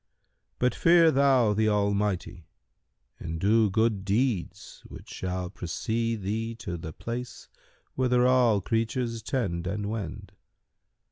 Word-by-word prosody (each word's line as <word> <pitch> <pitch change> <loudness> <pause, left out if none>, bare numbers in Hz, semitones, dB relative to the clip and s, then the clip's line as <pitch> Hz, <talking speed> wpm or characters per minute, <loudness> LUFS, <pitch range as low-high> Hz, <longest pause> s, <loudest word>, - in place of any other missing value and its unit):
But 125 0 +1
fear 165 -1 +5
thou 130 -6 +3
the 110 +1 +2
Almighty 100 -4 -1 0.7
and 80 0 -5
do 110 +3 +3
good 110 0 +1
deeds 105 -1 -2
which - - -12
shall 90 -1 -4
precede 110 +4 -3
thee 110 +3 -3
to 90 -6 -6
the 80 -1 -7
place 115 +8 -7 0.4
whither 125 -1 +2
all 125 -5 +4
creatures 115 +2 -1
tend 95 -9 -2
and 100 +2 -3
wend. 105 -8 -6
110 Hz, 120 wpm, -27 LUFS, 95-120 Hz, 0.7 s, fear